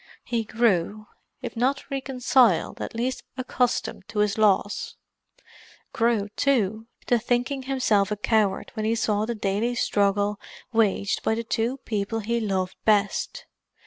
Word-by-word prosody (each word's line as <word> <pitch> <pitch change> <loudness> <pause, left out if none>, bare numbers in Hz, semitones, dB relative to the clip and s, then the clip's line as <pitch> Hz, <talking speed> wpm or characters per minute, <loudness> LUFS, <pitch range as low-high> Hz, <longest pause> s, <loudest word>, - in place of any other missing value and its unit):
He 235 -2 -1
grew, 215 -2 +1 0.4
if - - -5
not 275 +4 0
reconciled, 255 -6 +2
at - - -5
least 250 +3 -2 0.2
accustomed 250 -5 -1
to - - -8
his 210 -1 +2
loss; 205 -1 +1 1.0
grew, 225 -3 +1
too, 220 -3 0 0.2
to 240 - +3
thinking 245 +4 0
himself 255 -7 +1
a 210 - -2
coward 210 -1 +1
when 220 - -3
he 225 - +2
saw 215 -2 +1
the 235 - -2
daily 210 +4 -1
struggle 205 -1 +1 0.3
waged 205 -3 +1
by 220 - +1
the 230 - -3
two 230 +3 -1
people 215 +1 -2
he 235 +3 -1
loved 190 -4 -2
best. 205 -1 +1
220 Hz, 140 wpm, -25 LUFS, 205-240 Hz, 1.0 s, to